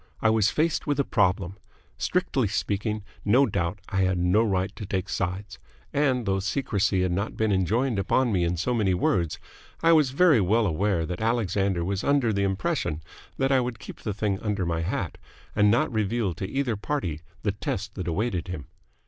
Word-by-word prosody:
I 110 - +3
was 110 -1 +3
faced 160 +1 0
with 145 -1 0
a - - +4
problem. 95 -4 +1 0.4
Strictly 180 - 0
speaking, 105 +1 -2 0.2
no 125 +7 +5
doubt, 85 -4 -1
I 100 - -2
had 95 -1 +2
no 90 +5 +3
right 95 -3 0
to - - -7
take 95 -1 -2
sides; 95 +2 -3 0.3
and, 130 -4 +1
though 95 -1 +1
secrecy 100 -3 0
had 90 - 0
not 100 +4 -2
been 110 -1 +1
enjoined 110 +5 +1
upon 120 +5 +2
me 90 -4 +2
in 85 +1 0
so 110 +9 0
many 100 -6 +2
words, 85 -2 +1 0.5
I 165 - +6
was 155 -5 +5
very 145 -3 +4
well 110 +5 +3
aware 90 -1 +1
that 90 +4 -5
Alexander 100 -6 +1
was 95 +1 -2
under 140 -6 +2
the 100 - 0
impression 95 -5 -1 0.3
that 135 +1 +1
I 135 - +5
would 120 -2 -3
keep - - -10
the 105 - -2
thing 100 -1 -1
under 105 -4 -1
my 85 -1 -1
hat 85 - -3 0.4
and 105 0 +5
not 120 +5 +2
reveal 110 -2 0
to 95 +3 -5
either 135 -4 0
party 100 - -3 0.2
the 105 - +1
test 100 0 -4
that 90 -3 -5
awaited 90 0 -1
him. 80 -6 -5
100 Hz, 190 wpm, -26 LUFS, 95-115 Hz, 0.5 s, I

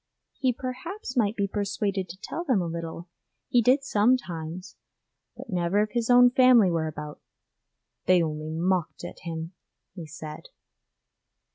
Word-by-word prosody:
He 260 -2 +2
perhaps 255 - -6
might 220 -3 +2
be 200 -2 0
persuaded 200 -2 -2
to 175 - -9
tell 340 - -4
them 260 - +2
a 175 - -1
little, 165 +1 -5 0.4
he 245 - +4
did 260 +5 +3
sometimes, 190 -8 0 0.6
but - - -9
never 180 +3 +2
if 215 - -5
his 235 -1 -1
own 245 0 +7
family 250 -7 +6
were 165 -1 0
about 150 -1 -7 0.9
'they 180 -2 +5
only 155 -1 -4
mocked 175 +1 -1
at - - -9
him,' 165 +1 -6 0.4
he 170 -4 -8
said. 150 0 -9
195 Hz, 145 wpm, -26 LUFS, 165-245 Hz, 0.9 s, own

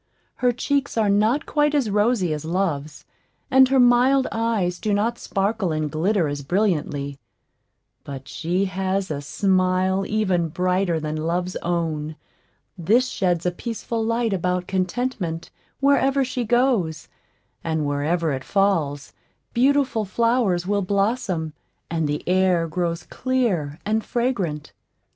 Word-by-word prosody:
Her 250 -1 +2
cheeks 280 +2 -1
are 215 -3 +3
not 215 +8 +2
quite 295 0 +1
as 255 -8 +1
rosy 205 -5 +2
as 150 0 -4
Love's, 160 -4 -2 0.5
and 265 0 +6
her 270 0 +3
mild 250 +2 +5
eyes 220 -6 0
do 210 -2 0
not 230 +3 0
sparkle 200 -2 -1
and 155 -1 -2
glitter 175 +2 +1
as 145 0 -4
brilliantly; 145 -5 -1 0.8
but 135 -2 -8
she 170 +9 -1
has 190 0 -2
a 145 -1 -3
smile 185 +3 +1
even 190 -6 +1
brighter 180 0 0
than 155 0 -3
Love's 175 +3 -2
own; 160 -3 -2 0.6
this 220 +8 +2
sheds 175 -4 0
a 180 - +2
peaceful 230 +3 -4
light 230 -1 0
about 180 -1 -1
Contentment 185 -3 -2 0.3
wherever 275 -1 +3
she 250 -1 -3
goes; 225 - +1 0.6
and 160 -2 -1
wherever 150 +3 0
it 135 -1 -3
falls, 160 -8 0 0.4
beautiful 260 -2 +2
flowers 220 -4 +1
will 200 +1 +1
blossom, 195 -4 -1 0.4
and 160 -2 0
the 150 - -3
air 180 -2 +2
grow 170 +1 -1 0.2
clear 205 - -1
and 220 +1 0
fragrant. 200 - -2
190 Hz, 130 wpm, -23 LUFS, 165-230 Hz, 0.8 s, and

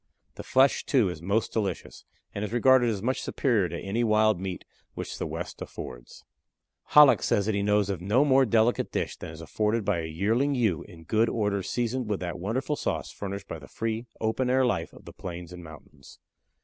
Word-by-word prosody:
The - - -8
flesh, 135 +1 +3
too, 120 -9 +2
is 80 -3 -7
most 100 +6 0
delicious, 100 -6 -3 0.3
and 100 - -3
is 105 - -4
regarded 120 +1 +4
as 105 -3 -3
much 130 +3 0
superior 110 - +1
to 85 - -5
any 110 +5 -1
wild 110 -3 +3
meat 95 -1 -5 0.3
which - - -6
the - - -2
west - - -6
affords. - - -9 0.6
Hallock 150 -2 +7
says 100 - +1
that 110 - 0
he 100 - 0
knows 105 0 +2
of 95 -4 -3
no 110 +10 +3
more 135 -2 +4
delicate 115 +2 +2
dish - - -2
than - - -8
is 80 0 -10
afforded 105 +5 -1
by 100 -4 +1
a 80 - -3
yearling 110 - +1
ewe 110 - +1
in 80 -2 -13
good 110 +7 +2
order 105 -3 0
seasoned 120 +4 -2
with 105 - -1
that 85 -2 -4
wonderful 130 - -1
sauce - - -3
furnished 100 0 -6
by 80 - -6
the 70 - -13
free, 115 +1 -3
open 115 +3 0
air 130 +1 +3
life 85 -9 -1
of - - -16
the - - -10
plains 90 0 -7
and 90 -1 -9
mountains. 75 -3 -14
105 Hz, 205 wpm, -27 LUFS, 90-120 Hz, 0.6 s, Hallock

